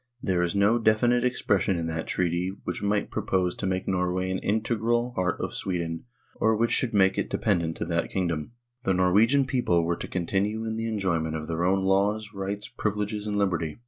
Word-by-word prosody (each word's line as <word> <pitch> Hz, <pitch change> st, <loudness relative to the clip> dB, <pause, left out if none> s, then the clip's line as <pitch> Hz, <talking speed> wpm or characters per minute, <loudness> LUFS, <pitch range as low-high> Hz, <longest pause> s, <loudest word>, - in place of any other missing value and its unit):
There 95 Hz, -5 st, 0 dB
is 90 Hz, +2 st, 0 dB
no 100 Hz, +4 st, +4 dB
definite 120 Hz, +2 st, +3 dB
expression 100 Hz, -6 st, +1 dB
in 85 Hz, -, -2 dB
that 80 Hz, 0 st, -3 dB
treaty 90 Hz, +1 st, 0 dB
which -, -, -4 dB
might 100 Hz, 0 st, 0 dB
propose 90 Hz, -2 st, 0 dB
to -, -, -4 dB
make 95 Hz, 0 st, -2 dB
Norway 90 Hz, 0 st, 0 dB
an 95 Hz, -, -1 dB
integral 115 Hz, +3 st, 0 dB
part 90 Hz, -4 st, -1 dB
of -, -, -3 dB
Sweden, 85 Hz, -2 st, -3 dB, 0.3 s
or 110 Hz, 0 st, +3 dB
which 115 Hz, +1 st, +1 dB
should 125 Hz, -, +1 dB
make 95 Hz, -2 st, +3 dB
it -, -, -2 dB
dependent 85 Hz, -6 st, 0 dB
to -, -, -3 dB
that 85 Hz, 0 st, -1 dB
kingdom. 85 Hz, 0 st, -2 dB, 0.3 s
The 110 Hz, -7 st, +1 dB
Norwegian 105 Hz, +10 st, +4 dB
people 120 Hz, -11 st, +1 dB
were 85 Hz, +1 st, 0 dB
to -, -, -6 dB
continue 100 Hz, +5 st, -1 dB
in 110 Hz, 0 st, -2 dB
the 115 Hz, 0 st, -2 dB
enjoyment 85 Hz, -7 st, -1 dB
of 80 Hz, -1 st, -4 dB
their 85 Hz, +1 st, -2 dB
own 95 Hz, +2 st, +2 dB
laws, 105 Hz, +2 st, +1 dB
rights, 100 Hz, +1 st, -4 dB
privileges, 105 Hz, -3 st, -3 dB
and 105 Hz, -1 st, -1 dB
liberty. 85 Hz, -6 st, 0 dB
95 Hz, 195 wpm, -26 LUFS, 90-110 Hz, 0.3 s, no